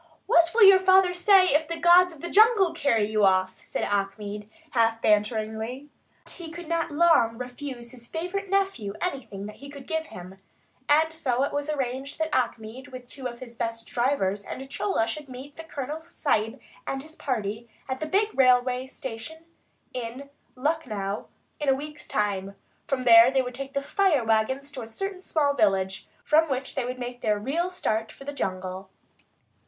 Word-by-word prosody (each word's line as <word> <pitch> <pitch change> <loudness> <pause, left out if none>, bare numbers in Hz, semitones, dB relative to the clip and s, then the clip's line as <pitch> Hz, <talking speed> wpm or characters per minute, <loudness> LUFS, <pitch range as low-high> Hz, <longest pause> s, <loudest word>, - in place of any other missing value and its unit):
"What 335 0 +4
will 460 - +6
your 390 -1 +9
father 375 -1 +5
say 370 +1 +5
if 300 +2 +2
the 335 0 -4
gods 350 +2 +6
of 310 -4 -14
the 345 - -3
jungle 420 -5 +5
carry 235 -9 +2
you 215 0 0
off?" 185 -1 +2
asked - - -12
Achmed, 205 +1 -2 0.2
half 225 -3 +2
banteringly. 220 +5 0 0.3
But - - -8
he 340 -3 -8
could 340 0 -9
not 335 0 -1
long 290 -8 +3
refuse 250 -1 -7
his 240 -2 -11
favourite 365 +6 -4
nephew 385 - 0
anything 250 - -4
that 210 - -9
he 280 - -11
could 280 -2 -10
give 320 +1 -2
him, 180 +2 -11 0.5
and 315 +2 +4
so 265 -5 0
it 285 - -2
was 290 +1 -2
arranged 270 -1 -3
that 320 -1 -2
Achmed, 245 +1 -2
with 255 -2 -10
two 260 0 -6
of 240 0 -9
his 240 -2 -9
best 230 -1 -4
drivers, 225 -6 0
and 265 +5 -7
Chola, 380 - 0
should 280 +5 -5
meet 260 +3 -10
the 325 - -8
Colonel 295 -1 -5
Sahib 265 -7 -1 0.3
and 270 0 -3
his 315 +1 -9
party 225 -4 -3 0.2
at 260 0 -3
the 310 - -3
big 405 +6 +2
railway 255 0 +3
station 265 +6 -8 0.5
in 255 +3 -6 0.2
Lucknow 250 -9 -2 0.3
in 295 -2 0
a 265 - +5
week's 295 +2 -8
time. 200 -2 -1 0.3
From 265 -2 -1
there 230 0 +8
they 265 0 +2
would 250 0 -6
take 275 +2 -7
the 275 - 0
"fire 335 -5 +2
wagons" 225 +6 0
to 270 -3 -7
a 225 - -7
certain 385 - -5
small 295 -6 +1
village, 195 -5 +1 0.2
from 315 +1 +3
which 265 0 -3
they 265 -3 -2
would 250 +1 -4
make 245 0 -6
their 210 -1 +1
real 305 - -1
start 225 -11 -2
for - - -13
the 285 - -5
jungle. 185 -5 -4
265 Hz, 185 wpm, -26 LUFS, 225-315 Hz, 0.5 s, your